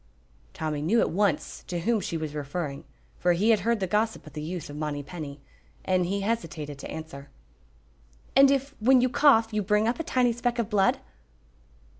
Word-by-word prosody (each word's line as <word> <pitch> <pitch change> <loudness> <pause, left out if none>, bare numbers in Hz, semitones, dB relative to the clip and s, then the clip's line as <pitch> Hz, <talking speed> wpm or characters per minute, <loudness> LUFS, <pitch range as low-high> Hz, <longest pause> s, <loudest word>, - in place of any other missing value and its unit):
Tommy 155 -2 -3
knew 200 +10 +2
at - - +1
once 190 -3 0
to 175 -2 -3
whom 225 +5 +1
she 170 -3 -3
was 155 -2 -4
referring, 145 0 -4 0.3
for 175 0 +3
he 205 +7 +3
had 220 - +4
heard 230 +3 0
the 190 - 0
gossip 215 +2 -1
of 155 - -12
the 150 - -5
youth 170 +1 -5
of 145 - -9
Monypenny, 150 0 -5 0.5
and 185 -2 +1
he 200 +2 -1
hesitated 165 -10 -3
to - - -8
answer. 155 -3 -8 1.1
"And 275 +1 +8
if, 275 +1 0
when 250 +3 +5
you 255 - +2
cough, 230 -5 +4
you 210 - +1
bring 210 +2 +2
up 235 - -1
a - - -1
tiny 250 -5 +2
speck 240 +1 -1
of 235 -4 -2
blood?" 195 -2 +3
190 Hz, 190 wpm, -27 LUFS, 155-230 Hz, 1.1 s, And